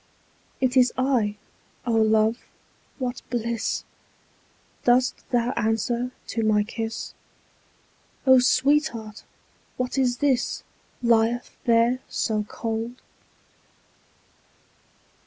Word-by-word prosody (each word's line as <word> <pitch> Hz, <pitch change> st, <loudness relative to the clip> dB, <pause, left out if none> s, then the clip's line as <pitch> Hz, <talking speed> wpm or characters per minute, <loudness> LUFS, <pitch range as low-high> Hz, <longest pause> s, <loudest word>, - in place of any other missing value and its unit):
20 -, -, +1 dB
It 255 Hz, +1 st, +1 dB
is 250 Hz, -, +2 dB
I—O 240 Hz, -2 st, -2 dB
love, 220 Hz, +1 st, +3 dB, 0.6 s
what 250 Hz, -2 st, -3 dB
bliss! 235 Hz, -2 st, -2 dB, 1.0 s
Dost 250 Hz, +1 st, +2 dB
thou 240 Hz, 0 st, +1 dB
answer 235 Hz, +1 st, 0 dB, 0.2 s
to 230 Hz, -, -2 dB
my 215 Hz, -1 st, +3 dB
kiss? 225 Hz, +1 st, -5 dB, 1.1 s
O 260 Hz, -1 st, +7 dB
sweetheart! 255 Hz, -4 st, +1 dB, 0.5 s
what 255 Hz, +2 st, -1 dB
is 245 Hz, -2 st, +2 dB
this 270 Hz, -3 st, 0 dB, 0.4 s
Lieth 235 Hz, +1 st, +2 dB
there 235 Hz, +2 st, +3 dB
so 215 Hz, -2 st, 0 dB
cold? 225 Hz, +2 st, -4 dB
235 Hz, 85 wpm, -25 LUFS, 225-250 Hz, 1.1 s, O